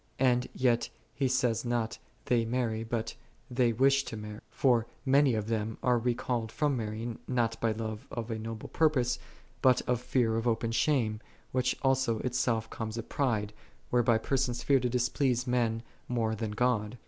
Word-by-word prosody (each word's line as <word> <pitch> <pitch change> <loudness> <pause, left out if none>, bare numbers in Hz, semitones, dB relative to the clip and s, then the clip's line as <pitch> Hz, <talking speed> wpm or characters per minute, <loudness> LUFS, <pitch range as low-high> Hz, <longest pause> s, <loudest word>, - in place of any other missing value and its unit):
And 125 -1 +3
yet 120 -2 +2 0.2
he 135 -1 0
saith 125 -3 +1
not, 120 -2 -1 0.3
they 120 -2 +2
marry, 115 -1 -1
but 115 0 -3 0.4
"they 120 -1 +3
wish 135 +4 +3
to 110 - -6
marry." 105 0 -7
For 120 -1 +2 0.2
many 135 -2 +4
of 110 -1 -1
them 110 0 -2
are 125 -1 +3
recalled 120 -1 -1
from 145 -2 +1
marrying, 110 0 -4
not 115 -3 0
by 115 - +2
love 110 -1 -5
of 120 -1 -5
a 110 - -2
noble 110 0 -6
pur 160 -1 +3
pose, 125 -4 0 0.4
but 130 -1 +4
by 125 - +2
tear 120 -2 +1
of 115 +2 -1
open 115 0 +1
shame, 115 -4 +1 0.3
which 125 -1 +1
also 130 -4 +2
itself 120 -3 0
comes 110 0 -4
of 115 - -6
pride, 110 -7 0 0.4
whereby 120 -2 +4
persons 125 +1 -1
fear 140 -1 +4
to 125 0 0
displease 125 0 +1
men 120 -3 0 0.3
more 115 -3 0
than 110 0 -3
God. 115 -1 0
120 Hz, 170 wpm, -30 LUFS, 110-125 Hz, 0.4 s, many